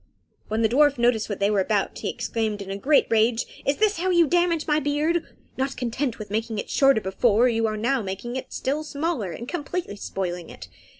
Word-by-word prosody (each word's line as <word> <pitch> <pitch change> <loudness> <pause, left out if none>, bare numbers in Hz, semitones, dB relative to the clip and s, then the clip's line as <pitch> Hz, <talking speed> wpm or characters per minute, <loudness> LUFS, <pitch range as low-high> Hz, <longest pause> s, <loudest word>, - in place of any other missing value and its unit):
When 220 +2 0
the - - +5
dwarf 285 +4 +4
noticed 235 -3 +2
what 205 - -3
they 200 +1 +2
were 205 - +2
about, 200 +1 0
he - - -2
exclaimed, 220 -2 -2
in 195 -1 -6
a - - -2
great 280 +9 +3
rage, 225 +1 +3 0.2
"Is 280 - +2
this 425 -1 +2
how 370 +2 0
you 345 -2 +5
damage 345 0 +1
my 300 0 +2
beard? 305 +4 0 0.3
Not 265 +1 -2
content 250 +1 -2
with 210 -2 -8
making 220 +1 -2
it - - -4
shorter 270 -5 +4
before, 215 +4 +3
you 225 -2 +1
are 215 0 -2
now 245 +4 +1
making 195 +5 -5
it 260 - -5
still 290 +4 -2
smaller, 295 - -2
and 235 +9 -7
completely 340 - -4
spoiling 180 -4 -4
it. 90 - -11
240 Hz, 215 wpm, -24 LUFS, 210-290 Hz, 0.3 s, the